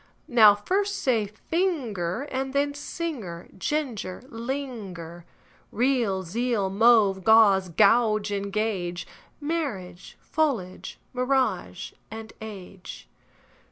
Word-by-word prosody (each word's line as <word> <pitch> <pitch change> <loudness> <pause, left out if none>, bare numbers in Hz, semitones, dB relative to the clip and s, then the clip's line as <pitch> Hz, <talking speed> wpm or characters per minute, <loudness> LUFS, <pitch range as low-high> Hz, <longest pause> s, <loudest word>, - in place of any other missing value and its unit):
) - - -39
Now 210 -1 +9
first 395 - -1
say: 230 -6 +1
finger, 235 - -2
And 265 +1 -2
then: 285 +1 +1
singer, 285 - -5
ginger, 235 -6 -3
linger. 225 - -6 0.5
Real, 235 -6 +1
zeal; 210 +1 -1
mauve, 205 -3 +4
gauze 200 -4 +5 0.6
and 200 0 -3
gauge; 185 -5 -2 0.3
Marriage, 260 - -4
foliage, 245 - -2 0.2
mirage, 250 -8 -1 0.5
age. 195 - -9
220 Hz, 90 wpm, -26 LUFS, 190-265 Hz, 0.6 s, Now